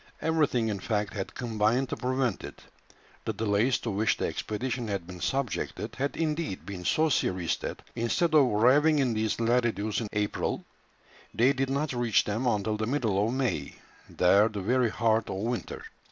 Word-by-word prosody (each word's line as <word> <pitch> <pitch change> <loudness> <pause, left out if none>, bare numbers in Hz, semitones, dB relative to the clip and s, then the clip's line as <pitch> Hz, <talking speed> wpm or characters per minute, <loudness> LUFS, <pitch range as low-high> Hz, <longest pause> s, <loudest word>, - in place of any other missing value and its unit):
Everything 150 -8 +1
in 100 -2 -2
fact 105 0 -2
had 100 -3 -5
combined 115 +2 +1
to - - -2
prevent 130 -4 -1
it; - - -9 0.6
the - - -2
delays 110 +4 +1
to 115 - -4
which 105 +1 +1
the - - -1
expedition 120 +2 -3
had 100 -4 -3
been 90 0 -10
subjected 130 +2 -2
had 140 +2 -2
indeed 155 - -2
been 95 -2 -6
so 155 - +2
serious 90 - 0
that - - -6
instead 155 +9 0
of 150 -2 +7
arriving 130 +8 +4
in 130 -4 +2
these 110 0 -1
latitudes 115 -3 +1
in 110 - -3
April, 105 0 -1 0.7
they 125 +4 +4
did 135 0 -1
not 140 +1 -1
reach 120 -3 +2
them 110 +5 -2
until 105 -1 0
the 110 0 -2
middle 115 -7 +1
of - - -1
May, 125 - -2 0.3
there 100 +4 +4
the 105 -3 -5
very 120 +4 +2
heart 110 -1 +1
of - - -3
winter. 115 +5 -3
115 Hz, 175 wpm, -28 LUFS, 105-130 Hz, 0.7 s, of